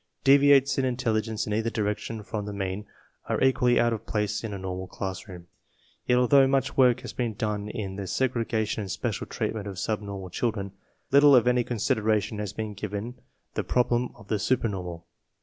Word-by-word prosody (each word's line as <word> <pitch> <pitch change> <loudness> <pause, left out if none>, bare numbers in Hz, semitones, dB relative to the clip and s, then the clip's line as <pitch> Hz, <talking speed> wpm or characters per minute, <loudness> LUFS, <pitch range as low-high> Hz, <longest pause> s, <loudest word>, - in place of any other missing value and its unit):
Deviates 140 0 +5
in - - +1
intelligence 115 -4 -1
in 105 - -3
either 110 +2 0
direction 105 0 -3
from 105 -1 -4
the 105 - -4
mean 95 +1 -4 0.4
are - - +1
equally 125 -2 +3
out 120 -1 +3
of 110 0 -6
place 105 0 -1
in 110 - -4
a 100 - -4
normal 95 0 -5
classroom; 95 -2 -6 0.6
yet, 125 - +4
although 135 +2 +5
much 135 0 0
work 125 -3 +4
has - - -7
been 120 -4 -2
done 105 -1 -2
in 100 -4 -5
the 100 - -4
segrega 115 -2 0
tion 105 - -3
and 100 - -6
special - - -3
treatment 105 -2 -3
of 95 -2 -6
subnormal 100 -3 -4
children, 100 -2 -2 0.4
little 140 0 +7
if 120 - +5
any 125 0 +3
consideration 110 -2 0
has 105 -2 -3
been 110 0 -5
given 105 +3 -5 0.4
the - - -1
problem 120 0 +1
of 100 - -16
the 105 -1 0
supernormal. 95 -8 -1
110 Hz, 185 wpm, -27 LUFS, 100-125 Hz, 0.6 s, little